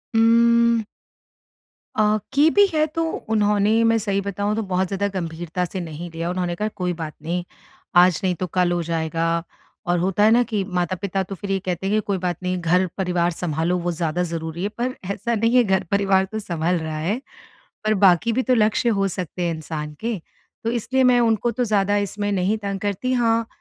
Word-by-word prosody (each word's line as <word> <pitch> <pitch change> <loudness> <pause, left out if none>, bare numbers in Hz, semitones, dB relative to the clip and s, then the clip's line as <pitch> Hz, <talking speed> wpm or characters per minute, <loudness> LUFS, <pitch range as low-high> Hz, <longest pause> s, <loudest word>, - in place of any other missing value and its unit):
उम्म 235 0 +4 1.1
अ, 215 0 +3 0.2
की 290 +3 +5
भी 405 +3 +6
है 310 -1 +3
तो 330 +2 -2 0.3
उन्होंने 210 +1 +3
मैं 230 0 +4
सही 200 -2 -1
बताऊँ 200 +1 -2
तो 225 - -1
बहुत 185 -1 0
ज़्यादा 200 +2 -1
गंभीरता 170 +1 -3
से 185 +2 -5
नहीं 170 0 -6
लिया, 165 +1 -3
उन्होंने 180 -1 -2
कहा, 210 +4 -1
"कोई 180 -4 -3
बात 160 -2 -6
नहीं, 175 +3 -2 0.5
आज 175 -1 +6
नहीं 185 -1 +1
तो 180 +2 -3
कल 180 +1 +1
हो 175 0 0
जाएगा।" 165 0 -1 0.4
और 175 0 +2
होता 190 +3 +1
है 215 - +6
ना 240 +2 +5
कि 215 -4 -2
माता-पिता 185 +2 -1
तो 195 +1 -7
फिर 195 +2 -5
ये 195 - +1
कहते 180 +1 -2
हैं 205 - +1
कि, 215 - +2
"कोई 200 -1 0
बात 175 -2 -2
नहीं 185 0 -1
घर 180 +3 +3
परिवार 180 -2 +1
सँभालो 165 +1 -1
वो 175 - +1
ज़्यादा 170 +1 -1
ज़रूरी 165 0 -4
है।" 200 - 0
पर 255 +2 -1 0.2
ऐसा 235 +4 -2
नहीं 230 +3 +1
है 250 - +6
घर 190 -3 +1
परिवार 195 -1 +3
तो 220 - -3
सँभल 175 -3 -1
रहा 160 -1 -4
है, 200 +11 -1 0.6
पर 215 0 +2
बाकी 190 +5 +5
भी 255 +3 +1
तो 255 0 +2
लक्ष्य 220 +1 +2
हो 195 0 +2
सकते 180 -1 -5
हैं 170 -1 0
इंसान 150 -1 -6
के। 230 -2 -2 0.5
तो 230 - +1
इसलिए 245 +3 0
मैं 250 -1 +5
उनको 230 0 +2
तो 245 +2 -1
ज़्यादा 205 -2 +1
इसमें 205 0 -2
नहीं 195 +2 +1
तंग 200 -2 -4
करती, 205 +5 -1
हाँ, 230 -2 +2
195 Hz, 205 wpm, -22 LUFS, 175-220 Hz, 1.1 s, भी